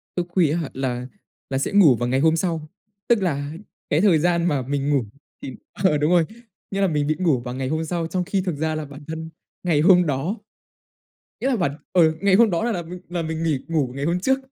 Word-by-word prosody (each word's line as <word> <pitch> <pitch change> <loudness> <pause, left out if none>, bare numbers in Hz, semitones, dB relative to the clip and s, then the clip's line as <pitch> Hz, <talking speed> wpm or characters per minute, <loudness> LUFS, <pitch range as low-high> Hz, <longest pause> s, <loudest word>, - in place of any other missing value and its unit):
Thức 175 -1 -1
khuya 170 -5 +2
á - - 0
hả? 155 - -4
Là 125 -2 -3 0.4
là 135 - -1
sẽ 135 - -1
ngủ 175 -11 +6
vào 120 +1 -2
ngày 130 +1 +2
hôm 160 +2 +4
sau, 165 -3 -2 0.4
tức 230 -4 +3
là 145 -5 -1 0.4
cái 150 +4 +2
thời 180 -7 +5
gian 170 +1 +2
mà 145 -5 +1
mình 140 +2 -2
ngủ 135 -6 +2 0.4
thì 130 - -7 0.2
ờ, 180 -5 +2
đúng 150 +3 +1
rồi, 170 -3 +4 0.5
nghĩa 195 0 -1
là 195 - +4
mình 150 -3 0
bị 155 - +1
ngủ 160 -9 +2
vào 125 0 -6
ngày 130 0 -3
hôm 160 +3 -1
sau, 170 0 -2
trong 180 +2 -1
khi 195 +1 -1
thực 180 -5 -2
ra 155 +1 -1
là 155 -1 -4
bản 145 +1 -12
thân 160 0 -5 0.3
ngày 160 -4 +2
hôm 180 0 +6
đó 150 - -1 1.0
nghĩa 265 - 0
là 255 - +2
bản 150 -7 -1 0.2
ừ, 160 -3 +4
ngày 200 -1 +3
hôm 225 0 +5
đó 175 +6 0
là 235 - 0
là 175 -3 -2
mình 175 +2 -9
là 175 -1 -2
mình 160 0 -3
nghỉ 150 -5 +1
ngủ 145 -7 0
ngày 140 - -3
hôm 175 +3 0
trước. 265 +5 +2
160 Hz, 250 wpm, -23 LUFS, 145-180 Hz, 1.0 s, ngủ